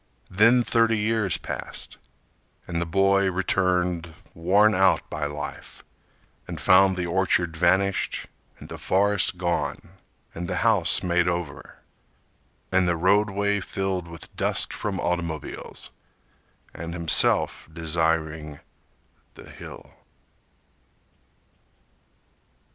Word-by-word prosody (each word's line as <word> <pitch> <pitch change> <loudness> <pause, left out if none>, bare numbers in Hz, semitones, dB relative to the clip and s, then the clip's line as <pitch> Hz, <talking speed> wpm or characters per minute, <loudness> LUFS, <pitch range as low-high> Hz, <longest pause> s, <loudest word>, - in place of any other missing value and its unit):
Then 115 +6 +5
thirty 115 -1 +2
years 110 -3 0
passed, - - -6 0.7
And 85 -1 -3
the 85 - -2
boy 100 +2 +3
returned 90 -2 0 0.2
worn 100 +6 +3
out 95 -1 +3
by 75 -1 -2
life 75 0 -8 0.6
And - - -6
found 95 0 +5
the 90 - -1
orchard 85 -1 0
vanished, 95 +4 +1 0.3
And - - -12
the - - -8
forest 100 -1 +1
gone, 85 -1 -2 0.4
And 85 +1 -5
the - - -1
house 100 -8 +3
made 90 -1 +1
over, 85 -5 -4 1.0
And 95 -1 +3
the 85 -1 +1
roadway 100 +3 +2
filled 95 -2 -3
with 85 0 -11
dust - - 0
from 100 -3 -3
automobiles— 85 -4 -4 0.8
And 85 0 -6
himself 85 -1 +2
desiring 80 -2 -1 0.8
The - - -13
Hill! - - -12
90 Hz, 105 wpm, -25 LUFS, 85-100 Hz, 1.0 s, Then